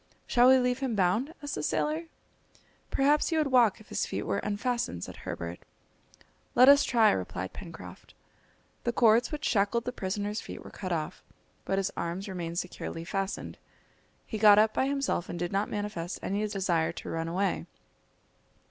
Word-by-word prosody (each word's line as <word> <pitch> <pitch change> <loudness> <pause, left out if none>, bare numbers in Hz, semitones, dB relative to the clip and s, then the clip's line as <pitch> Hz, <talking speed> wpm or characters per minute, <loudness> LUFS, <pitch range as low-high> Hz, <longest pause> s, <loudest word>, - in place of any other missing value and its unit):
"Shall 245 0 +4
we 260 - +8
leave 250 0 +1
him 260 -4 -1
bound?" 205 - +1
asked 290 - -4
the - - -2
sailor. 310 +3 -1 0.8
"Perhaps 290 +2 +3
he 325 - 0
would 300 -3 +1
walk 235 -4 +4
if 215 - -17
his - - -1
feet - - -3
were 200 - -1
unfastened," 210 - -2
said - - -7
Herbert. 85 +1 -6 1.0
"Let 255 - +7
us 285 0 +8
try," 230 -3 +4
replied 95 0 -3
Pencroft. 170 -5 -11 0.7
The 240 - 0
cords 235 0 +4
which 300 -1 -4
shackled 215 +2 +1
the 250 - -2
prisoner's 205 0 -3
feet - - -9
were - - -11
cut 185 -2 -6
off, 160 -3 -3 0.4
but 195 - 0
his 195 -1 0
arms 175 +4 -3
remained 170 -3 -5
securely 165 -2 -4
fastened. 195 +2 -4 0.7
He 220 - -5
got 210 -1 +8
up 215 +1 +4
by 265 - +1
himself 275 -10 -1
and 175 - -4
did 175 0 -3
not 200 +2 0
manifest 205 -5 -4
any 205 +2 -1
desire 175 -5 0
to - - -8
run 165 0 -2
away. 190 +4 -1
205 Hz, 175 wpm, -29 LUFS, 180-245 Hz, 1.0 s, we